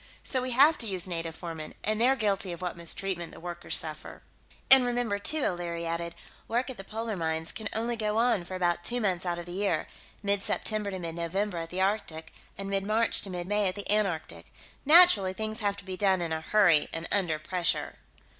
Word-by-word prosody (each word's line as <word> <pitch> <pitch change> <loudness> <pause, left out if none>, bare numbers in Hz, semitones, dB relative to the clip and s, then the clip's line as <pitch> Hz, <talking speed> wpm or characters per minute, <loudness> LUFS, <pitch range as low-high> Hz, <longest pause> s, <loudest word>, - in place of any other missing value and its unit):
So 260 - -1
we 255 - -3
have 280 +6 +5
to 230 - -2
use 185 -4 -2
native 165 -2 -4
foremen, 165 -3 -7
and 215 +1 0
they're 260 +3 +4
guilty 200 -5 -1
of 170 - -7
what 180 -1 -4
mistreatment 170 +1 -3
the - - -11
workers 175 0 -3
suffer." 155 -1 -5 0.5
"And 265 -1 +13
remember, 245 -4 -1
too," 305 +8 +2
O'Leary 170 -2 -3
added, 170 0 -3 0.3
"work 245 +3 -1
at 255 - -10
the 195 - -8
polar 220 +2 -4
mines 160 -1 -2
can 220 -2 -5
only 235 +2 -1
go 215 -1 -1
on 230 -5 +2
for 185 - -7
about 175 -1 0
two 245 +8 0
months 185 -5 -1
out 175 -1 -1
of 175 - -7
the 175 - -9
year 190 -3 -1 0.4
mid 200 0 0
September 215 0 -1
to 190 - -5
mid 170 -2 -5
November 175 +3 -2
at 165 0 -6
the 185 +2 -3
Arctic, 170 -5 -2 0.2
and 195 - -5
mid 195 0 -1
March 220 +3 +2
to 200 - -6
mid 175 -1 -5
May 205 0 +1
at 185 - -1
the 205 - -5
Antarctic. 195 -7 -1 0.3
Naturally, 295 - +6
things 220 +3 -4
have 205 -2 -1
to 200 - -11
be 185 -1 -6
done 190 -2 +2
in 170 -2 -2
a 160 - -3
hurry 175 -5 +3
and 165 0 -4
under 175 -6 +1
pressure." 170 +2 -2
190 Hz, 220 wpm, -28 LUFS, 170-215 Hz, 0.5 s, And